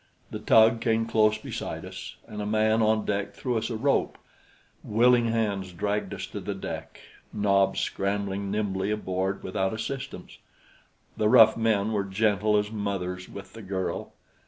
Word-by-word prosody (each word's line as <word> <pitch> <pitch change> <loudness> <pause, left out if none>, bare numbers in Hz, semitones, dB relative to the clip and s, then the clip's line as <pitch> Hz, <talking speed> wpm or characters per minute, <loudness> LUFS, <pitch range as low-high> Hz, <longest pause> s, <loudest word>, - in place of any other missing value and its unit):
The - - -4
tug 115 +1 +5
came 115 -1 +1
close 110 -1 +3
beside - - -6
us, - - -8
and 105 - -6
a - - -3
man 110 +1 +2
on 110 0 +2
deck 100 -1 -2
threw 125 -2 -2
us 115 +1 -1
a 115 - -3
rope. 140 +5 +1 0.7
Willing 120 +2 +4
hands 100 -5 -1
dragged 100 +2 -2
us - - -5
to 105 - -7
the 100 +1 -4
deck, 95 - -7 0.3
Nobs 100 -2 +2
scrambling 100 0 -2
nimbly 100 -1 -1
aboard 95 -2 -2
without 95 +1 -1
assistance. 135 +4 -6 0.8
The 105 - +2
rough 110 -2 +7
men 110 -2 +1
were 105 -2 0
gentle 105 +1 +1
as 105 0 -1
mothers 95 -4 -3
with 100 - -10
the 115 - -9
girl. 95 -2 -4
105 Hz, 160 wpm, -27 LUFS, 100-110 Hz, 0.8 s, rough